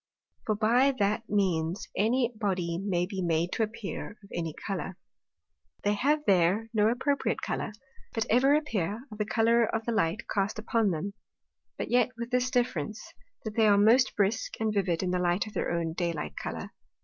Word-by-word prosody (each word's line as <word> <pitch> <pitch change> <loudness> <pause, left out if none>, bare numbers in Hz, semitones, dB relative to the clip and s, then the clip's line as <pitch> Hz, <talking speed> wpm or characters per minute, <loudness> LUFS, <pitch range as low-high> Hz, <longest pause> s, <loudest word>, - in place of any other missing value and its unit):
For 215 - +2
by 240 +6 +3
that 210 +2 0
means 185 -3 0
any 240 +4 +2
body 185 -6 -1
may 185 -3 0
be 190 0 -4
made 170 0 +1
to - - -1
appear 215 -1 -4
of 200 - -17
any 165 -2 -2
Colour. 190 -1 -4 0.9
They 205 - +2
have 295 +8 +1
there 195 +4 +3
no 210 -1 +4
appropriate 280 +4 0
Colour, - - -2 0.4
but 225 -2 -1
ever 265 +5 +4
appear 225 - -1
of 210 - -9
the 210 - +1
Colour 230 +1 +3
of 225 0 -1
the 235 - 0
Light 215 -2 0
cast 200 +1 -1
upon 220 0 +1
them; 185 +4 -3 0.6
but - - -4
yet 245 +1 +4
with 235 0 -5
this 250 0 +2
difference, 220 - -2 0.3
that 215 -1 -4
they 220 -1 +4
are 205 -1 +5
most 230 +6 +5
brisk 205 +2 0
and 220 -1 0
vivid 190 -4 0
in 180 - 0
the 180 - +1
Light 175 +2 +1
of 215 - -10
their - - -1
own 170 -1 -1
day 170 0 -1
light 150 - -5
colour. - - -5
210 Hz, 185 wpm, -29 LUFS, 185-230 Hz, 0.9 s, are